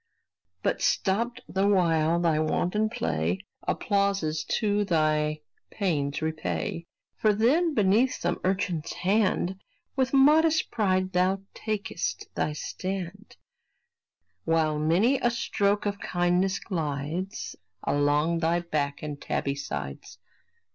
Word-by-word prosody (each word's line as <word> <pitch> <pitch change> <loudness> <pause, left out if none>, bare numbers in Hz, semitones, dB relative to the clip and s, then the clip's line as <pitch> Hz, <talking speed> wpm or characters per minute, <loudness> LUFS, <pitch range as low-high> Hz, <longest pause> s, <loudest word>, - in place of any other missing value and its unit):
But, - - 0
stopped 230 +5 0
the 195 +1 +1
while 170 -4 +3
thy 165 -3 +2
wanton 180 +7 +1
play, 90 - -2 0.2
Applauses 195 -6 0
too 210 -2 +1
thy 155 -4 +1 0.3
pains 150 -8 -1
repay: 160 +1 -3 0.3
For 215 -1 +3
then, 295 +9 +3
beneath 215 +5 +3
some - - -2
urchin's 185 -4 -1
hand 190 -1 +1 0.3
With 260 -1 +1
modest 305 +4 +4
pride 185 -4 +1
thou 185 +2 +2
takest 210 -6 -3
thy 150 - -1
stand, 190 +5 -5 1.1
While 160 -2 +1
many 190 - +3
a 240 - +2
stroke 205 -4 0
of 200 -1 -2
kindness 180 +2 +1
glides 160 +1 -4 0.3
Along 145 +3 +2
thy 170 +1 +1
back 150 -4 -2
and 150 -1 -5
tabby 140 - -1
sides. 70 - -6
185 Hz, 110 wpm, -27 LUFS, 155-205 Hz, 1.1 s, modest